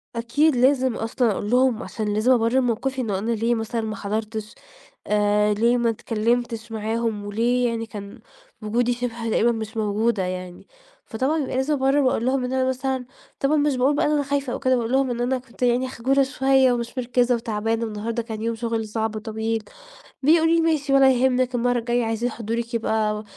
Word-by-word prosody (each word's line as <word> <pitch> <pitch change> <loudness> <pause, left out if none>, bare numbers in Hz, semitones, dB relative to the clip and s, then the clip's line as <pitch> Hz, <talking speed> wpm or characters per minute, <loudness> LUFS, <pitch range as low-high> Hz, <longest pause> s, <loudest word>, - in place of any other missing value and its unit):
أكيد 255 +6 +2
لازم 260 -1 +3
أصلًا 225 +1 0
أقول 205 +1 -3
لهم، 250 -1 +2
عشان 215 -2 -3
لازم 215 +5 +2
أبرر 240 +1 +3
موقفي 260 +2 -1
إنه 210 -5 -1
أنا 225 +4 -2
ليه 230 +1 +1
مثلًا 225 +1 -2
ما 215 -1 -4
حضرتش، 215 +1 -4 0.5
آآ 210 0 +2
ليه 235 +4 +2
ما 235 -1 +1
اتكلّمتش 230 +1 -1
معاهم، 220 -1 -2
وليه 240 +4 +1
يعني 230 -1 -3
كان 205 -2 -9 0.4
وجودي 235 +3 0
شبه 235 -1 -4
تقريبًا 230 +2 +3
مش 220 0 -5
موجودة 215 0 0
يعني، 180 -1 -6 0.4
فطبعًا 260 +7 -1
يبقى 280 -4 -2
لازم 265 +3 +1
أبرر، 270 0 +2
وأقول 255 -4 +1
لهُم 260 0 +1
إن 250 +1 -3
أنا 260 0 +1
مثلًا 260 0 -2 0.3
طبعًا 275 +3 +2
مش 290 -2 +2
باقول 260 +3 +2
بقى - - +1
إن 295 - +1
أنا 295 -1 +2
خايفة 280 -2 -2
أو - - -3
كده، 260 -1 +2
باقول 235 -1 -2
لهم: 265 0 +2
"إن 240 0 -3
أنا 255 +2 +1
كنت 250 -1 -16
يعني 245 +1 +2
خجولة 265 +3 +1
شوية، 265 -1 +3
ومش 235 +2 -4
مركِّزة 245 0 +2
وتعبانة، 225 0 -2
النهارده 225 +2 -3
كان 220 -2 -6
يوم 230 +1 -1
شغل 225 -1 -2
صعب 220 0 -2
وطويل." 220 +1 -3 0.6
بيقولوا 325 +3 +4
لي: 335 - +3
"ماشي 310 -4 +1
ولا 270 -1 +6
يهمِّك، 255 0 +1
المرة 245 0 +1
الجاية 240 0 0
عايزين 225 +2 -1
حضورِك 230 +1 -4
يبقى 215 -2 0
235 Hz, 190 wpm, -23 LUFS, 220-260 Hz, 0.6 s, ولا